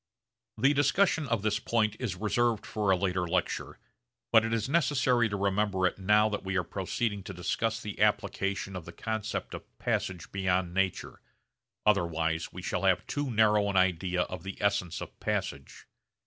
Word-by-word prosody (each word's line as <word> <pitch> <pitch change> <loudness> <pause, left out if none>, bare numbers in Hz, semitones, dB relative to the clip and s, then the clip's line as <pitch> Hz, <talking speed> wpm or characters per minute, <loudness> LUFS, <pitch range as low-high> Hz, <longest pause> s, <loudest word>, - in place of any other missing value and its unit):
The 135 +6 +4
discussion 145 +2 +2
of 115 -4 -1
this 105 -1 +1
point 110 -2 +1
is 115 -8 -2
reserved 110 +3 0
for 105 -2 -1
a 95 - +6
later 90 -1 0
lecture 90 +2 -2 0.5
but 115 -1 +6
it 115 - -2
is 115 0 0
necessary 135 -6 +2
to 100 - -2
remember 100 -1 +1
it 90 - 0
now 105 +3 +4
that 105 - -3
we 95 0 -1
are 95 - +1
proceeding 100 +4 -2
to 95 0 -8
discuss 110 +6 -1
the 105 -4 -6
application 95 0 0
of 90 -3 -6
the 85 - -10
concept 110 +2 -4
of - - -10
passage 90 -3 -2
beyond 95 -2 0
nature, 95 0 -1 0.6
otherwise 80 -5 +1
we 90 - -9
shall 90 - -2
have 95 -2 +2
too 145 -1 -2
narrow 105 -2 +3
an 95 - 0
idea 90 0 +2
of 90 -2 -7
the 95 +2 -7
essence 100 -4 0
of - - -9
passage. 70 0 -3
100 Hz, 175 wpm, -29 LUFS, 90-110 Hz, 0.6 s, a